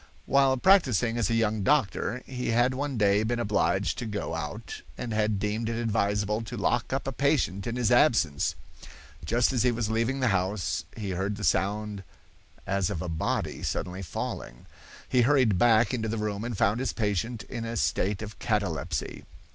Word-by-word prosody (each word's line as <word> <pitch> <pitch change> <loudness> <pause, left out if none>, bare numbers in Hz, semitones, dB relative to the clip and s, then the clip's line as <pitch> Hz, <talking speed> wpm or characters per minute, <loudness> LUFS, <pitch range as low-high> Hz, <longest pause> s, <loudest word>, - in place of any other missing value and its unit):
"While 135 -1 +3
practising 125 - +4
as 105 - +1
a 115 - +1
young 110 -2 +1
doctor, 125 0 +1
he 125 -1 -4
had 120 +3 +3
one 140 -1 -3
day 100 -1 +3
been 115 +2 -1
obliged 100 -2 0
to 120 - -4
go 105 -1 -3
out - - -5 0.2
and 120 -2 -4
had 110 -1 +1
deemed 105 +3 -2
it 115 0 -2
advisable 105 -1 0
to 115 +2 -7
lock 115 +2 0
up 135 +1 -1
a - - 0
patient 135 -9 0
in 120 - -2
his 125 -2 +1
absence. 115 - +3 0.7
Just 120 +3 +2
as 125 - +1
he 125 +1 +3
was 115 -2 -2
leaving 115 +4 0
the 130 -2 +2
house 95 -2 -1
he 100 -3 -3
heard 95 +3 -2
the 105 - -7
sound 105 +2 0 0.6
as 100 -2 0
of 85 - -3
a 90 - -4
body 80 -1 -2
suddenly 90 +1 -3
falling. 70 -7 -5 0.4
He 125 - +3
hurried 125 -7 +3
back 115 +2 +4
into 110 -3 -1
the 115 +1 -2
room 105 -1 -2
and 120 -3 -4
found 105 +2 +2
his 130 - -1
patient 110 +1 -2
in 115 +3 -6
a 115 0 -4
state 100 +1 0
of 110 0 -9
catalepsy. 90 - -2
110 Hz, 185 wpm, -27 LUFS, 100-120 Hz, 0.7 s, practising